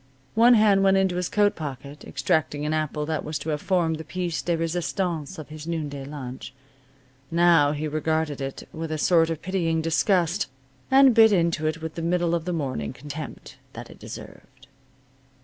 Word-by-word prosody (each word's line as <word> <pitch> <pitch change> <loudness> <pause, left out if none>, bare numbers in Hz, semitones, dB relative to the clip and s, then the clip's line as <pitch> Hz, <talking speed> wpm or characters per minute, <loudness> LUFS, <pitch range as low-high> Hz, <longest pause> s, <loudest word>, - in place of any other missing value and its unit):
One 235 +2 +6
hand 210 -3 +5
went 195 0 +4
into 190 -2 +1
his 180 -1 -1
coat 205 -1 +2
pocket, 145 -1 -7
extracting 145 +1 -1
an 155 - 0
apple 155 -1 -1
that 155 -1 -2
was 155 0 -3
to 160 - -6
have 150 -1 -1
formed 170 -4 +1
the 160 - -7
piece 175 -1 -3
de 170 -1 0
resistance 165 -1 -2
of 155 -2 -9
his 155 +1 -9
noonday 145 -5 -4
lunch. 130 -4 -8 0.7
Now 165 -4 +4
he 155 +1 -3
regarded 155 -1 -1
it 135 0 -6
with 160 0 -5
a 155 - -1
sort 165 +1 +3
of 165 -2 -4
pitying 170 -4 0
disgust, 170 +3 +1 0.4
and 265 -1 +7
bit 220 -1 +7
into 170 -4 +1
it 160 +1 -3
with 160 -1 -4
the 170 - -5
middle 170 0 +1
of 170 -1 -1
the 180 - -2
morning 130 - -3
contempt 145 +3 -8 0.2
that - - -9
it - - -15
deserved. 130 0 -11
160 Hz, 185 wpm, -25 LUFS, 150-175 Hz, 0.7 s, and